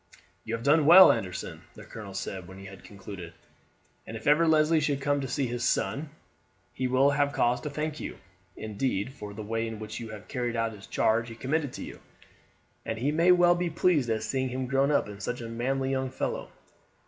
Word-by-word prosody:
"You 115 - -3
have 115 - -7
done 150 +1 +4
well, 185 +3 +10
Anderson," 90 -1 -4
the - - -11
colonel 100 -3 -9
said 95 -2 -5
when 95 +1 -11
he 95 - -11
had 95 -1 -11
concluded; 100 -4 -9 0.7
"and 110 - -6
if 110 - -12
ever 150 +3 +4
Leslie 155 0 +4
should 145 -2 0
come 145 +1 0
to 135 - -3
see 135 +2 -1
his 120 -1 -3
son 150 +2 0 0.6
he 130 - -1
will 130 +3 +4
have 145 0 +1
cause 120 +1 +1
to 150 - -4
thank 150 +1 -4
you, - - -6 0.4
indeed, 110 +1 -2
for 105 -5 -9
the 110 - -6
way 115 +2 -2
in 110 -1 -6
which 110 0 -7
you 115 -2 -7
have 110 -1 -10
carried 120 -1 -3
out 115 0 0
the 105 - -11
charge 115 +4 0
he 115 - -9
committed 140 +3 -1
to - - -6
you, - - -9 0.8
and 115 - -4
he 135 +6 0
may 170 +4 +4
well 175 -1 +6
be 175 0 -1
pleased 160 -6 +2
at 110 -1 0
seeing 130 +2 -1
him 130 +1 -3
grown 135 +2 +2
up 145 - +2
such 120 +5 -3
a 115 - -6
manly 130 +4 -1
young 130 -1 -1
fellow. 130 - -4
130 Hz, 215 wpm, -28 LUFS, 110-145 Hz, 0.8 s, well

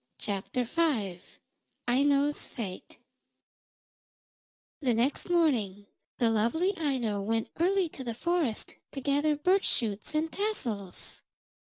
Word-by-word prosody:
AINO'S 280 +3 +3
FATE 200 -8 -6 1.8
The 255 -6 +2
next 255 +9 +1
morning 235 - +2 0.3
the 230 -2 +3
lovely 320 - +2
Aino 255 - 0
went 225 +2 0
early 375 +1 +3
to 270 - -8
the 235 -2 -3
forest 335 -6 -1 0.2
to 275 - -4
gather 290 +3 +2
birch 370 +7 +3
shoots 220 +4 0
and 315 +1 +1
tassels. 235 - -3
275 Hz, 100 wpm, -30 LUFS, 225-320 Hz, 1.8 s, AINO'S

